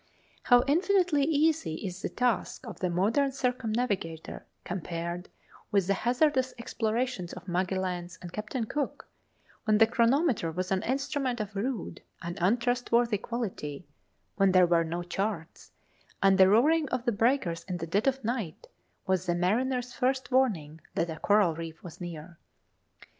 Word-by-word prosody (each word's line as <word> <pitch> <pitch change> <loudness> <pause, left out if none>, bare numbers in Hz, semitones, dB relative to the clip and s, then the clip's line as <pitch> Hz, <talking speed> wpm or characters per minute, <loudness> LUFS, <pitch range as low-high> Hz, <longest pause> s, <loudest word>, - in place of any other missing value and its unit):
How 245 -1 +5
infinitely 340 -1 +3
easy 305 - +2
is 185 0 -5
the - - -2
task 245 0 -1
of 215 -7 -8
the 180 - 0
modern 220 +11 +2
circumnavigator 225 -10 -2 0.2
compared 175 0 -4 0.4
with 200 -3 +2
the 195 - +2
hazardous 260 +4 +1
explorations 235 -4 -2
of 180 +1 -10
Magelhaens 180 -1 -2
and 175 -1 -9
Captain 215 +3 -3
Cook, 290 +5 -3 0.6
when 215 -1 +4
the 225 - +7
chronometer 235 - +2
was 185 +3 -3
an 190 -1 +2
instrument 270 -1 -1
of 210 -1 -5
rude 220 0 -3 0.2
and 170 +1 -4
untrustworthy 235 +1 +2
quality, 185 - -4 0.5
when 195 -2 +4
there 185 -1 +7
were 170 -1 +3
no 170 +2 -3
charts, 180 -1 -4 0.5
and 195 0 +5
the 190 0 +8
roaring 295 +8 +4
of 255 -1 -2
the 240 - +3
breakers 205 -7 +1
in 180 -1 -3
the 165 - -4
dead 200 +9 0
of 270 -1 +1
night 220 -8 -3 0.4
was 185 -1 0
the 175 - +2
mariner's 245 +7 0
first 260 +1 0
warning 170 - +1
that 170 - 0
a 160 - -7
coral 205 -5 +3
reef 165 0 -8
was 175 +1 -10
near! 170 -1 -8
210 Hz, 150 wpm, -29 LUFS, 175-250 Hz, 0.6 s, the